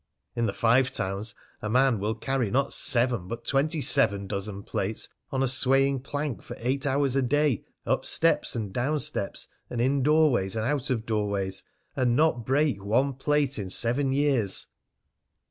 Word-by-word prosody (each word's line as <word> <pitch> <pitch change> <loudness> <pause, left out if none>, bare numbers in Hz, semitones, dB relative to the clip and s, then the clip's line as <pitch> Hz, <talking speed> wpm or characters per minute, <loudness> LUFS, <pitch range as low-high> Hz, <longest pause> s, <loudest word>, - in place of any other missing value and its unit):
In 115 -1 0
the - - 0
Five 120 +5 +3
Towns 105 -1 -3 0.3
a 105 - -3
man 130 -1 +3
will 105 +3 -1
carry 130 -1 -1
not 135 +5 0
seven 120 -7 +2
but 115 +3 -6
twenty 150 +3 +1
seven 105 -9 +3
dozen 100 0 -5
plates 105 +3 -2 0.2
on 135 0 0
a - - +2
swaying 135 +1 +3
plank 140 -4 -4
for - - -9
eight 135 +4 -1
hours 135 -1 +1
a 135 - +3
day, 145 -2 +1 0.2
up - - 0
steps - - +2
and 105 -5 -4
down 145 +5 0
steps, 145 -9 -2 0.2
and 120 - -4
in 135 +3 +2
doorways 140 -9 +3
and 110 0 -1
out 145 +1 -1
of 115 -4 -1
doorways, 100 -3 -1 0.3
and 125 -2 +1
not 140 -6 +1
break 135 -6 +1
one 130 +7 +1
plate 140 -1 0
in 95 -2 -4
seven 125 +7 +1
years! 135 -8 +1
125 Hz, 170 wpm, -27 LUFS, 110-140 Hz, 0.3 s, Five